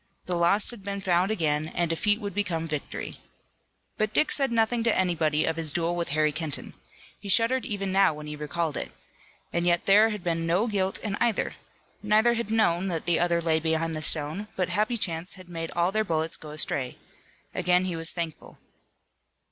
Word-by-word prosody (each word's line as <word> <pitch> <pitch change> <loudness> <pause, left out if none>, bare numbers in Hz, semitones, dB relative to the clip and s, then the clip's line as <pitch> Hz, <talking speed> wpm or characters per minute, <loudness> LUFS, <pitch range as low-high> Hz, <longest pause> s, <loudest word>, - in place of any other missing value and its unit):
The 180 - -2
lost 175 +6 +4
had 235 -4 -10
been 200 0 -4
found 185 0 +1
again 155 -7 0
and 175 - +1
defeat 205 +6 +1
would 205 -4 -5
become 175 -5 -2
victory. 150 -2 -5 0.8
But 215 0 -1
Dick 305 - +3
said 275 -3 +2
nothing 230 +1 +2
to 230 - +2
anybody 160 -5 +1
of 160 0 -1
his 160 -2 -1
duel 170 +2 -1
with 170 -1 -2
Harry 155 +1 +2
Kenton. 160 -2 -4 0.5
He 200 - -8
shuddered 230 +3 +4
even 195 -2 -3
now 195 -1 +4
when 150 0 -9
he 150 0 -6
recalled 150 +1 -3
it. - - -5 0.6
And 170 0 0
yet 175 -1 +2
there 210 +3 +6
had 210 -4 -5
been 165 -1 -1
no 180 +6 +2
guilt 195 -4 -1
in 205 -2 -3
either. 235 -3 0 0.5
Neither 215 +3 +3
had 235 -2 -3
known 195 -5 +2
that 165 -4 -3
the 175 -1 +2
other 170 -1 +1
lay 160 -1 +2
behind 160 0 -1
the 155 - -3
stone, 155 +7 +1
but 185 -2 -1
happy 215 +6 0
chance 170 -3 -2
had 185 -2 -13
made 165 -1 -5
all 175 +2 +2
their 215 +1 +1
bullets 160 -3 +1
go 155 - -10
astray. 140 -4 -2 0.6
Again 180 +1 +2
he 180 -2 -2
was 165 0 +4
thankful. 170 -3 -6
175 Hz, 195 wpm, -26 LUFS, 160-205 Hz, 0.8 s, there